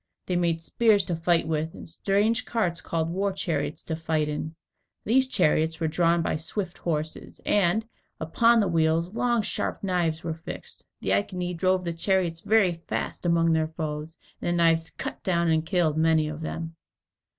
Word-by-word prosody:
They 180 - -1
made 170 -2 +1
spears 215 +1 +3
to 175 - -2
fight 165 0 +2
with, 160 0 -2
and - - -10
strange 205 +8 +1
carts 180 -8 -1
called 165 0 -2
war 195 +3 0
chariots 155 -6 -2
to 160 - -3
fight 160 -2 -1
in. 155 +2 -4 0.5
These 260 +4 +3
chariots 160 -7 +2
were 160 - 0
drawn 170 +1 +2
by - - 0
swift 175 +3 -4
horses, 155 -2 -4
and, 205 +2 +2 0.3
upon 230 +9 +4
the 200 - +1
wheels, 165 +1 +1
long 235 -1 +1
sharp - - -2
knives 175 -4 0
were 165 -1 -2
fixed. 165 +1 -9 0.2
The 95 - +1
Iceni 180 - -1
drove 185 +1 +1
the 170 - -2
chariots 170 -1 0
very 200 -2 +3
fast 170 +1 -4
among 165 -1 +3
their 160 -1 +2
foes, 155 0 -5 0.2
and - - -3
the 175 - +2
knives 165 0 +3
cut - - -6
down 170 -2 +1
and 160 -1 +2
killed 160 -3 +1
many 160 -1 +3
of 155 +1 -6
them. 165 +1 -5
165 Hz, 175 wpm, -26 LUFS, 160-185 Hz, 0.5 s, upon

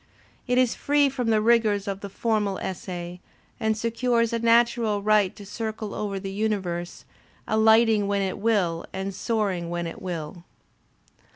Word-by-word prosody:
It 250 0 +1
is 255 -2 +3
free 290 0 +2
from 250 -3 -2
the 215 -1 +3
rigours 220 -3 +3
of 195 -1 -3
the 200 - -6
formal 210 -2 -1
essay 180 -1 -6 0.4
and 220 0 0
secures 230 +1 0
a 230 - 0
natural 230 -2 +2
right 210 -3 +3
to 205 - -11
circle 220 0 -5
over 200 -2 -3
the 195 0 -6
universe, 190 -5 -3 0.4
alighting 220 -1 +4
when 200 -1 0
it 190 -1 -3
will 195 -7 0
and 190 +1 -4
soaring 195 -5 -1
when 175 0 -3
it 165 - -7
will. 170 -2 -6
210 Hz, 155 wpm, -25 LUFS, 190-230 Hz, 0.4 s, alighting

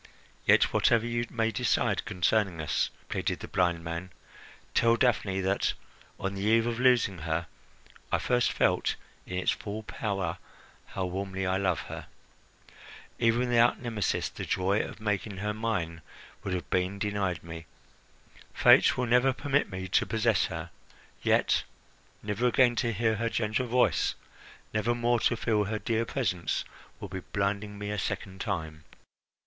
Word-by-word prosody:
"Yet - - +5
whatever 115 -1 +3
you 120 0 -1
may 115 -1 0
decide - - +1
concerning 90 -1 +1
us," 75 - 0 0.2
pleaded - - -2
the - - -6
blind 85 -3 +1
man, 85 +2 -5 0.6
"tell 115 0 +4
Daphne 105 -6 +1
that, 95 +1 +1 0.5
on 95 0 -2
the 100 - -5
eve 115 +2 +3
of 120 0 -2
losing 120 -8 +3
her, 80 +2 -2 0.7
I - - +3
first 125 -1 +1
felt - - +1 0.3
in 90 - -4
its 90 - +2
full 110 +1 -5
power 95 -6 -3 0.5
how 95 - -3
warmly 95 +1 -3
I 95 +1 +1
love 95 -1 0
her. - - -8 1.1
Even 120 +1 +2
without 120 0 +4
Nemesis, 115 -6 -1
the - - -7
joy 95 +3 +1
of - - -7
making 105 -1 -2
her 105 +2 -2
mine 95 -7 -2 0.4
would 95 -2 -2
have 90 - -4
been 95 +1 0
denied 100 -5 -1
me. 80 -1 -8 0.9
Fate - - +6
will 125 - +1
never 125 +2 +4
permit 145 +2 0
me 95 -1 -5
to - - +2
possess 110 -3 +2
her; - - -6 0.5
yet - - +3 0.6
never 105 +4 0
again 120 0 +4
to 120 -3 +1
hear 110 0 +1
her 115 +2 0
gentle 115 +2 -1
voice, 125 +1 +2 0.6
never 110 +3 +1
more 120 0 +2
to 115 - +2
feel 110 -2 +1
her 110 +2 -2
dear 115 +1 0
presence, 100 -10 -1 0.3
would 100 - -8
be 95 - -3
blinding 100 +2 -2
me 105 0 -4
a 105 - -2
second 95 0 -4
time." 80 -2 -4
105 Hz, 155 wpm, -29 LUFS, 95-115 Hz, 1.1 s, Fate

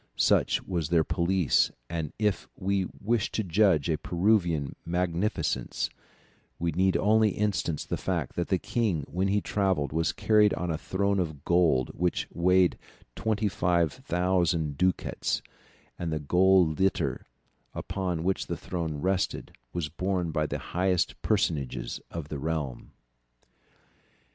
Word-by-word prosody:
Such - - +3
was 85 -6 -2
their 85 -2 +4
police, 85 0 +2 0.2
and 80 -2 -3
if 105 -4 0
we 95 -1 0
wish 110 +1 0
to 110 - 0
judge 90 -5 +3
of 80 -2 -1
Peruvian 85 -6 +1
magnificence, 90 +3 -1 0.7
we 85 0 -1
need 95 +4 +2
only 110 +1 +4
instance 95 -6 -1
the - - -2
fact - - -2
that 85 - -1
the 95 - +2
king 95 -6 -1
when 95 +2 -1
he 100 +1 +2
travelled 95 -10 0
was 80 +1 +1
carried 105 -1 +3
on 90 0 -2
a 80 - -1
throne 100 +2 0
of 80 -6 -4
gold 85 -8 +3
which 90 0 0
weighed 90 +1 +3 0.4
25,000 90 -5 0
ducats, 90 +3 0 0.6
and 85 -2 -2
the 80 - 0
golden 90 +2 +4
litter 80 -9 0 0.5
upon 90 -3 -3
which 95 +2 0
the - - -3
throne 85 -4 -4
rested 95 0 -1 0.2
was 85 -1 -2
borne 90 +1 -2
by 75 0 0
the - - -3 0.2
highest 90 0 +1
personages 80 - -1
of 80 -3 -6
the 75 - -4
realm. 75 -4 -3
90 Hz, 135 wpm, -28 LUFS, 80-95 Hz, 0.7 s, their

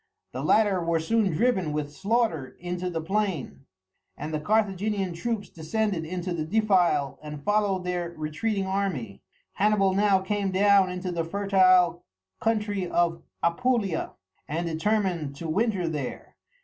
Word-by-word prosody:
The - - -5
latter 205 -5 +3
were 165 0 +1
soon 210 +4 +1
driven 190 -3 +1
with 150 -1 -3
slaughter 200 - 0
into 180 +1 -3
the 165 -2 -3
plain, 190 -7 -2 0.5
and 150 +2 -5
the 155 - 0
Carthaginian 200 0 0
troops 205 +4 -3
descended 175 +1 -2
into 180 +2 -3
the 160 -2 -2
defile 180 -7 +2
and 150 -1 -8
followed 205 -2 +1
their 180 -1 -2
retreating 190 +7 -2
army. 190 - -2 0.3
Hannibal 200 -2 +2
now 200 0 +4
came 200 +1 -1
down 195 0 +4
into 180 0 -4
the 170 -1 -1
fertile 185 -2 +3 0.4
country 210 -4 0
of 170 -1 +1 0.2
Apulia, 200 0 0 0.3
and 165 +4 -2
determined 170 -3 0
to 165 +4 -6
winter 195 +1 0
there. 150 -5 -5
185 Hz, 135 wpm, -26 LUFS, 165-205 Hz, 0.5 s, now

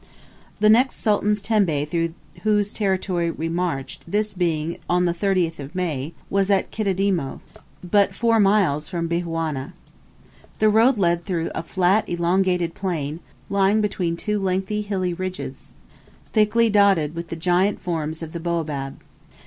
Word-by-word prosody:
The 210 - +4
next 245 +5 +5
sultan's 210 -1 +1
tembe 185 -10 +1
through 165 +1 -1 0.3
whose 210 -1 +1
territory 185 -4 0
we 165 0 -3
marched, 165 -6 -3
this 210 +2 0
being 170 -3 -1
on 180 0 +3
the 175 - +1
30th 170 -5 -1
May, 160 -4 -3
was 195 0 +1
at 195 -2 +2
Kididimo, 195 -8 -1 0.4
but 200 +3 +2
four 230 -1 +2
miles 195 -8 +3
from 170 -2 -2
Bihawna. 165 -5 -2 0.8
The 215 - +4
road 230 +4 +4
led 170 -3 +1
through 170 -3 -2
a - - -3
flat 185 +5 +1
elongated 175 0 +1
plain, 160 -5 -3 0.3
lying 200 +2 +2
between 185 -5 -1
two 210 +3 -1
lengthy 195 +2 -1
hilly 190 -4 -2
ridges, 185 +2 -6 0.6
thickly 220 +1 +4
dotted 200 -8 +3
with 170 0 -5
the 165 - -5
giant 180 +4 +1
forms 160 -2 -3
of 160 - -7
the 170 - -5
baobab. 155 -5 -3
180 Hz, 140 wpm, -23 LUFS, 165-205 Hz, 0.8 s, next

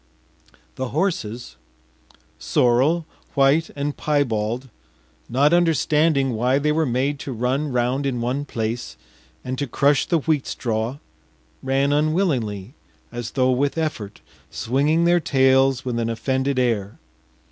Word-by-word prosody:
” - - -32
The 130 - -1
horses, 120 - -3 0.8
sorrel, 135 +8 +2 0.3
white, 140 +3 +3
and 145 0 -2
piebald, 125 -4 -1 0.6
not 140 +6 +3
understanding 155 -4 +2
why 125 +4 +1
they 150 +2 +1
were 155 0 +1
made 135 +4 -1
to 140 - -6
run 130 +5 -1
round 125 +3 0
in 125 -3 -2
one 125 +4 -1
place 115 -3 -4 0.5
and 130 0 -4
to 145 - -2
crush 140 +3 +2
the 170 - +2
wheat 155 -2 0
straw, 115 +2 -2 0.6
ran 135 +2 +1
unwillingly 140 - 0 0.4
as 120 -2 -6
though 130 -1 +2
with 140 +4 0
effort, 115 -11 -4 0.3
swinging 145 +7 +1
their 175 0 +4
tails 135 -3 +3
with 120 -2 -2
an 115 0 -1
offended 130 +3 -1
air. 115 -5 0
135 Hz, 130 wpm, -22 LUFS, 120-145 Hz, 0.8 s, their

